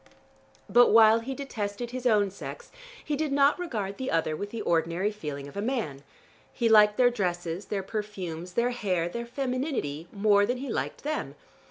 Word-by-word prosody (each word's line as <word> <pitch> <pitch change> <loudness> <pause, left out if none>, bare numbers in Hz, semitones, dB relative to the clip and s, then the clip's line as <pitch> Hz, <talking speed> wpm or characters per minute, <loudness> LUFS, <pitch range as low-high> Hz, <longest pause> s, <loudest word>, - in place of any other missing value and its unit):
But 245 0 +6
while 225 0 +7
he 260 +4 -5
detested 235 -4 -4
his 255 0 -2
own 205 -4 +3
sex, 480 - -9 0.3
he 300 - -1
did 300 0 -1
not 280 +3 +4
regard 215 - -3
the 260 - -3
other 160 -1 0
with 205 +6 -5
the 230 +1 -5
ordinary 170 +4 +1
feeling 150 -9 -6
of 140 - -13
a 200 - -2
man. 215 - -2 0.5
He 235 - 0
liked 210 -1 +6
their 245 -1 +5
dresses, 175 -4 -2
their 195 -1 -3
perfumes, 185 -5 -5
their 240 +4 +1
hair, 185 -8 -1
their 235 +6 -5
femininity, 250 - -3
more 205 0 +3
than 245 +2 -1
he 270 +1 -6
liked - - -3
them. 305 +1 -3
210 Hz, 180 wpm, -27 LUFS, 180-250 Hz, 0.5 s, while